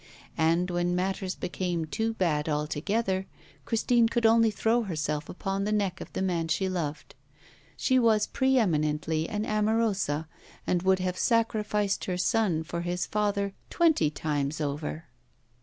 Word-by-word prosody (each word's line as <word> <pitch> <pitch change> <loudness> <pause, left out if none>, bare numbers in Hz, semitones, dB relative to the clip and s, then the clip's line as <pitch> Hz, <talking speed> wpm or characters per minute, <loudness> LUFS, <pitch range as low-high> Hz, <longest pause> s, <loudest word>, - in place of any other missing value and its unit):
And 165 +3 +2
when 175 0 0
matters 190 0 -2
became 175 -2 -2
too 225 +8 -2
bad 155 -6 0
altogether, 185 +7 -1 0.4
Christine 230 0 +2
could 235 -1 0
only 225 0 +5
throw 225 +3 +1
herself 155 -6 -3
upon 195 +1 -3
the 210 - -1
neck 200 -3 0
of - - -8
the - - -1
man 170 -3 0
she 175 +4 0
loved. 165 -5 -4 0.6
She 260 -1 +3
was 220 -3 +3
pre 265 0 +1
eminently 155 -5 +1
an 210 0 -2
amorosa 210 -8 0 0.4
and 175 - +1
would 190 +1 +3
have 185 0 -2
sacrificed 210 -3 +1
her 180 -1 -2
son 185 -4 +1
for 170 +2 -4
his 175 +1 -2
father 200 -2 -1 0.2
twenty 320 - +3
times 150 -1 -2
over. 150 +2 -3
185 Hz, 145 wpm, -28 LUFS, 160-215 Hz, 0.6 s, only